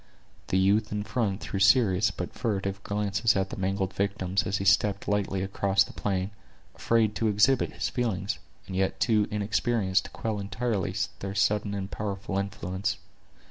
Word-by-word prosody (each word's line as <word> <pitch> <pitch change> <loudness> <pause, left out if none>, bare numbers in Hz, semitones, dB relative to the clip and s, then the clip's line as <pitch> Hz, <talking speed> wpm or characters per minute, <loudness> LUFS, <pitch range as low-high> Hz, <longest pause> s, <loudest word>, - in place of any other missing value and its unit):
The 95 - +1
youth 100 +3 +3
in 105 0 -2
front 105 -2 -1
threw 95 - -3
serious 100 -1 +5
but 90 - -6
furtive 100 -3 -2
glances 105 +2 +1
at 95 0 0
the - - -4
mangled 95 0 -1
victims, 100 -1 0
as 95 0 0
he 100 - -3
stepped 100 +1 +3
lightly 100 -2 0
across 95 0 +2
the - - -11
plain, 95 -1 -2 0.4
afraid 115 -2 +2
to 110 - +1
exhibit 110 +6 +3
his - - -2
feelings, 110 -5 -2 0.3
and 95 - -6
yet 95 0 0
too 105 -3 +3
inexperienced 105 -1 +1
to - - -7
quell 110 -2 -3
entirely 105 0 -2 0.2
their 100 0 -5
sudden 105 0 +1
and 95 -1 -4
powerful 100 -1 -3
influence. 100 0 -3
100 Hz, 165 wpm, -28 LUFS, 95-105 Hz, 0.4 s, serious